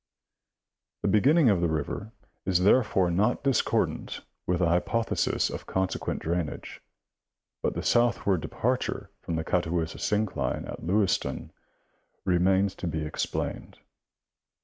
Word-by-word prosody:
The - - +2
beginning 135 +4 +5
of 95 -4 +1
the 85 - +3
river 80 +7 -3 0.3
is 90 -1 +1
therefore 100 -4 +4
not 105 +10 +1
discordant 135 -2 0 0.3
with 90 - +2
the 85 -1 +2
hypothesis 90 +7 +1
of - - -7
consequent 95 0 -2
drainage, 85 -2 -3 0.8
but - - -1
the - - -3
southward 115 -7 +2
departure - - -2
from 85 - -3
the 80 - -1
Catawissa 85 -1 -1
syncline 105 -1 -1
at - - -7
Lewistown 95 +2 0 0.7
remains 95 +2 +3
to - - -4
be 80 -1 -2
explained. 75 - -4
95 Hz, 120 wpm, -27 LUFS, 85-105 Hz, 0.8 s, beginning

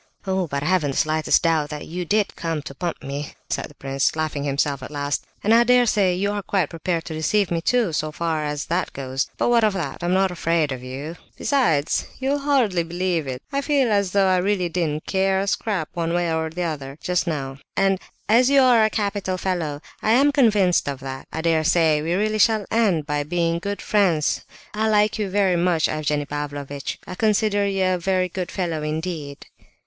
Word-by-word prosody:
"Oh, 190 -2 0
but 140 -1 -3
I - - -3
haven't 175 -4 +2
the 135 - -3
slightest 155 0 +2
doubt 160 -3 +2
that 150 -1 -6
you 175 +2 -5
did 205 +3 +1
come 165 -3 -3
to 140 - -8
pump 170 +4 -4
me," 140 +1 -5 0.2
said - - -1
the - - -18
prince, 135 +1 -1
laughing 155 -2 -2
himself, 140 0 0
at - - -7
last; 145 -1 -3 0.2
"and 215 - +4
I 235 +1 +6
dare 250 0 +4
say 195 -5 +2
you 200 +3 0
are 205 0 -2
quite 190 -5 -1
prepared 165 0 -2
to 160 - -6
deceive 175 +5 +1
me 165 -1 0
too, 230 -2 +1
so 155 0 -1
far 160 -1 -2
as 150 -1 -3
that 175 +2 -1
goes. 135 0 -3
But - - +1
what 235 -1 +4
of 215 -2 +3
that? 170 -7 -4
I'm 175 +1 +1
not 190 0 +2
afraid 165 -3 0
of 130 -1 -4
you; 140 +6 -7 0.2
besides, 165 - +1
you'll 275 +2 0
hardly 260 -11 +2
believe 170 -2 -2
it, 130 0 -5
I 280 - +1
feel 275 -5 +2
as 200 -2 +2
though 195 +1 +3
I 185 -1 +3
really 185 -1 0
didn't 160 -3 -2
care 190 0 +1
a 195 - 0
scrap 200 -5 -1
one 170 -1 -2
way 175 -2 0
or 160 0 -1
the 175 +3 -4
other, 145 -4 -4
just 180 0 -1
now!—And—and—and 155 +6 -1 0.3
as 245 +4 +5
you 280 0 +5
are 245 -3 +5
a 215 - +3
capital 200 -3 -2
fellow, 170 -6 -2 0.2
I 220 - +3
am 280 +4 +5
convinced 210 - +3
of 140 -2 -4
that, 135 0 -7
I 160 - -3
dare 160 -1 +2
say 160 -2 +3
we 165 +3 -1
really 215 +2 0
shall 215 -1 +3
end 200 -9 +2
by 150 -1 -1
being 170 +2 0
good 200 +3 -4
friends. 180 -8 +1 0.3
I 215 +1 0
like 210 +1 +2
you 205 -2 -1
very 190 -2 +2
much 170 -2 +2
Evgenie 150 -1 -1
Pavlovitch; 145 -1 -5
I - - -7
consider 210 0 +1
you 195 -1 0
a 185 0 +2
very 185 0 0
good 180 0 -4
fellow 170 -5 -2
indeed." 155 -2 -4
175 Hz, 215 wpm, -23 LUFS, 150-200 Hz, 0.3 s, I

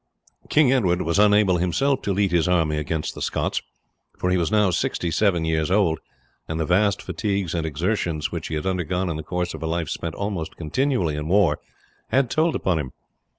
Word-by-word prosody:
King 145 -4 +4
Edward 90 -8 +2
was 85 +4 0
unable 105 -3 +5
himself 95 +11 +1
to 100 - -2
lead 100 -1 +1
his 85 -1 +2
army 80 -4 +2
against 75 +1 -2
the - - -9
Scots, - - -1 0.6
for 90 - 0
he 90 - +3
was 85 +2 0
now 105 -3 +3
sixty 85 0 -1
seven 85 -4 +2
years 80 -1 0
old, 90 -5 +2 0.5
and 80 0 -3
the 80 - 0
vast 100 +5 +2
fatigues 100 -5 -2
and 80 -2 -1
exertions 80 0 -1
which 85 -2 -4
he 80 - -3
had 75 - -3
undergone 90 -1 -1
in - - -3
the - - -4
course 90 +2 -3
of 80 - -8
a 80 - -2
life 85 0 -2
spent 85 -1 -4
almost 100 -6 -4
continually 90 - 0
in 75 +1 -4
war 100 +2 +3 0.5
had 130 -2 +1
told 160 +1 +2
upon 90 -4 0
him. 65 -4 -5
90 Hz, 200 wpm, -23 LUFS, 80-100 Hz, 0.6 s, unable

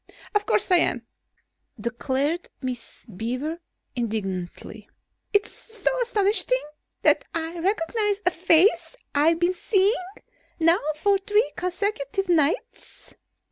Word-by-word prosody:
"Of 415 -1 +1
course - - +3
I 360 - +8
am," 240 -8 +2 0.7
declared 265 +8 -2
Miss 250 -3 -6
Beaver 250 - -4 0.4
indignantly. 210 -2 -4 0.4
"Is 410 - +4
it - - -17
so 465 +3 -2
astonishing 460 +2 +2 0.4
that - - +4
I 330 +1 -3
recognize 400 +3 0
a 360 - +4
face 360 +7 +3 0.2
I've 315 +3 +3
been 350 +1 +2
seeing 390 +2 +1 0.6
now 335 +2 +4 0.2
for 395 +5 +2
three 415 +4 +1
consecutive 365 -1 -2
nights?" 325 - -1
340 Hz, 110 wpm, -24 LUFS, 270-405 Hz, 0.7 s, I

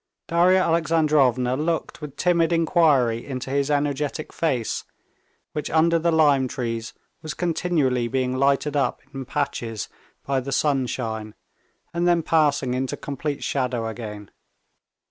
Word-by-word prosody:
Darya 175 +2 +4
Alexandrovna 150 -7 +2
looked 160 +2 -2
with 150 -3 -7
timid 170 -2 +2
inquiry 155 -9 +3
into 130 -1 -5
his 140 +1 0
energetic 145 +1 -1
face, 130 -9 -1 0.7
which 150 - -3
under 165 +1 +3
the 170 +1 +1
lime 145 -5 +4
trees 115 -2 -4 0.3
was 155 - -6
continually 155 -8 0
being 130 0 -1
lighted 140 +2 +1
up 140 - 0
in 135 -1 -5
patches 120 -6 -3 0.4
by 135 -1 +1
the 135 +2 -5
sunshine, 125 -6 -1 0.6
and 170 +1 0
then 170 -1 +3
passing 145 -6 +2
into 130 +1 -2
complete 145 +1 -4
shadow 125 -4 -1
again. 105 -3 -7
140 Hz, 125 wpm, -23 LUFS, 125-160 Hz, 0.7 s, Darya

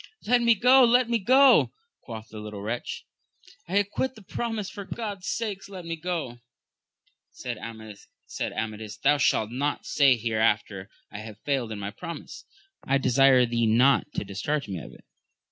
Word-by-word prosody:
Let 245 +2 +3
me 235 -1 +5
go, 255 +4 +6
let 245 0 +4
me 235 - +2
go! 265 +6 +5 0.3
quoth 110 -2 -9
the 110 - -9
little 105 -1 -7
wretch, 115 +3 -4 0.6
I 185 +4 0
acquit 205 +6 -1
the 215 - -14
promise; 220 +1 -3
for 200 - -7
God's 205 -2 -6
sake 205 -4 -3
let 185 -3 -9
me 165 0 -3
go 160 -8 -4 1.0
1 110 -3 -7 0.4
Said - - -3
Amadis, 110 -1 -5
Thou 145 +4 +3
shalt 110 -4 +2
not 145 +4 -2
say 140 -3 +4
here 115 -1 -2
after, 105 -3 0 0.2
I 100 - -7
have 110 -1 -9
failed 135 -6 -1
in 110 - -4
my 100 0 -5
promise. 170 +9 -9 0.4
I 135 - +2
desire 130 -1 +4
thee 115 -1 0
not 130 +6 +3
to - - -1
discharge 140 +9 -3
me 95 -4 -4
of - - -10
it. - - -17
135 Hz, 170 wpm, -26 LUFS, -, 1.0 s, go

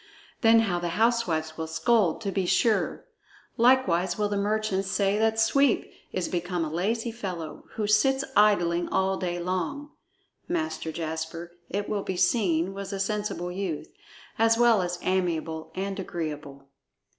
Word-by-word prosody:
Then 225 0 +6
how 185 -6 0
the 175 - -2
housewives 180 -9 +1
will 160 - -3
scold, 180 +2 +2
to 200 -3 -2
be 190 -2 -1
sure! 220 +4 +1 0.5
Likewise 190 -8 +3
will 210 -1 0
the 205 - -1
merchants 200 -1 0
say 200 +1 +1
that 220 0 +2
Sweep 275 +3 +2 0.2
is 185 -2 -2
become 175 -1 -2
a 155 - -5
lazy 225 +7 -1
fellow, 180 -9 -6
who 215 - -2
sits 265 +6 +3
idling 175 -5 +3
all 190 0 +1
day 175 -2 -2
long." 185 - -3 0.6
Master 320 - -2
Jasper, 160 +1 -5 0.2
it 200 +2 -2
will 205 -1 -1
be 190 -2 -4
seen, 185 -3 +2
was 195 0 -6
a 195 - -4
sensible 200 -3 -2
youth, 180 -4 -4 0.5
as 225 0 +4
well 235 -4 +5
as 175 -1 -2
amiable 165 -4 -1
and 195 +1 -3
agreeable. 150 -6 -6
195 Hz, 150 wpm, -27 LUFS, 175-220 Hz, 0.6 s, Then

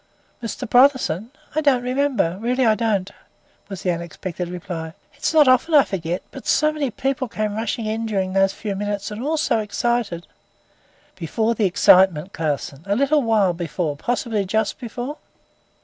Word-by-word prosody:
"Mr. 240 +2 -5
Brotherson! 245 - +3 0.2
I 310 - +1
don't 270 -5 +3
remember, 250 -9 0
really 250 +3 +1
I 220 - +5
don't," 210 -4 -1 0.6
was 195 -2 -7
the 180 - +2
unexpected 170 +1 -5
reply. 175 -3 -6 0.2
"It's 285 - -1
not 310 -3 +5
often 255 +6 +4
I 285 - +8
forget. 175 -4 -3
But 270 - -10
so 305 0 +3
many 295 -3 -1
people 260 +2 -2
came 215 -2 -2
rushing 225 +1 -2
in 220 +1 -2
during 190 -3 -1
those 195 0 +3
few 205 0 -5
minutes, 205 +1 -3
and 210 +2 -6
all 310 +4 0
so 295 - +1
excited 210 -4 -1 0.5
" - - -35
"Before 220 +7 0
the 220 -2 0
excitement, 185 -1 +4
Clausen. 150 -2 -3
A 200 - +1
little 280 +4 +3
while 215 -6 +2
before, 165 -2 -3
possibly 225 +4 -1
just 215 +2 -1
before." 250 +4 -5
215 Hz, 165 wpm, -22 LUFS, 185-250 Hz, 0.6 s, I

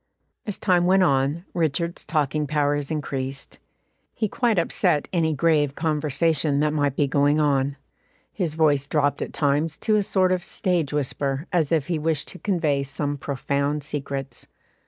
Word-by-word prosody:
As 205 - -3
time 175 -2 +2
went 190 +1 +5
on, 140 +2 +1
Richard's 170 +1 -1
talking 150 -1 -1
powers 145 -1 0
increased; 135 -3 -4 0.6
he 215 - 0
quite 230 0 0
upset 155 -3 +1
any 160 -3 +1
grave 145 -2 +2
conversation 155 -1 +1
that 150 0 +1
might 145 -3 0
be 145 - +2
going 145 +2 +2
on; 140 -2 +1 0.6
his 170 -6 -2
voice 145 -4 +2
dropped 145 -2 +1
at - - -4
times 150 +2 0
to 215 -1 +1
a - - +3
sort 190 -2 +2
of 180 -1 0
stage 175 -7 -1
whisper, 140 0 -2
as 165 -4 +1
if 160 -4 +2
he 170 -3 -2
wished 155 -1 0
to 185 - -7
convey 160 -8 0
some 145 +1 -2
profound 140 +1 -2
secrets. 140 -2 -5
150 Hz, 155 wpm, -24 LUFS, 140-165 Hz, 0.6 s, went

